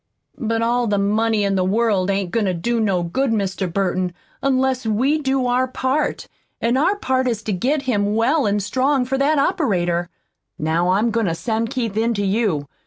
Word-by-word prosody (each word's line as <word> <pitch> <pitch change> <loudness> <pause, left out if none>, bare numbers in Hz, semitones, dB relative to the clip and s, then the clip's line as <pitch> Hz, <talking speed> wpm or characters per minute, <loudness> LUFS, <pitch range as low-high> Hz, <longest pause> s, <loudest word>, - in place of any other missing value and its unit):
"But 230 -2 -1
all 240 +1 +1
the 205 -1 +1
money 215 +2 +1
in 200 0 +1
the 190 -1 +1
world 200 -1 +1
ain't 195 -2 -1
goin' 225 +1 +1
to 185 - 0
do 235 +8 -1
no 195 -5 +1
good 260 +11 -1
Mr. 195 -4 -1
Burton, 185 -1 -1 0.3
unless 265 -1 +1
we 250 +8 +1
do 265 -2 0
our 250 +1 +1
part, 260 +3 -1 0.3
an' 235 +2 +1
our 315 +9 +2
part 260 -9 0
is 230 -3 -2
to 215 - -2
get 270 +10 0
him 210 -5 0
well 255 +4 +2
an' 205 0 +1
strong 260 +5 +1
for 265 +2 -2
that 295 +2 +2
operator. 180 - 0 0.5
Now 165 +3 0
I'm 210 +5 +2
goin' 230 -3 0
to 165 - -1
send 225 +4 -2
Keith 235 -6 -3
in 230 +1 +1
to 205 0 -1
you. 195 -8 0
225 Hz, 195 wpm, -20 LUFS, 195-260 Hz, 0.5 s, our